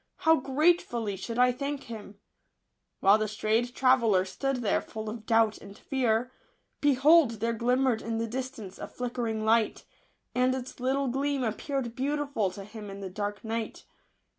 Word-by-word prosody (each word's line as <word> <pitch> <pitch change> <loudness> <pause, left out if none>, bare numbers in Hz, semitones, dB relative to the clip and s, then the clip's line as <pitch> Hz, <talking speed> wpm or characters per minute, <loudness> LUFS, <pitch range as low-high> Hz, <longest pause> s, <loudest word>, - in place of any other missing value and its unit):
how 320 0 +7
gratefully 265 - +1
should 230 +5 -5
1 250 0 +5
thank 280 0 -3
him 215 -3 -9
I" - - -43 0.8
While 200 +2 +7
the 215 - 0
strayed 220 +4 0
traveller 235 -8 +4
stood 260 +6 -2
there 210 - +2
full 220 -1 -6
of 220 -1 -9
doubt 225 -2 +3
and 200 +1 -12
fear, 250 -2 0 0.5
behold 290 -1 +5
there 230 +1 -1
glimmered 245 0 +1
in 225 0 -3
the 230 - -1
distance 230 -5 -6
a - - -5
flickering 235 -3 -3
light; 225 0 +2 0.5
and 255 +1 +2
its 260 0 -7
little 265 +2 0
gleam 275 +1 0
appeared 240 +1 -3
beautiful 280 -5 -1
to 195 +2 -9
him 210 0 -9
in 195 0 -8
the 190 -2 -6
dark 205 +1 -4
night. 225 0 -4
235 Hz, 165 wpm, -28 LUFS, 215-265 Hz, 0.8 s, how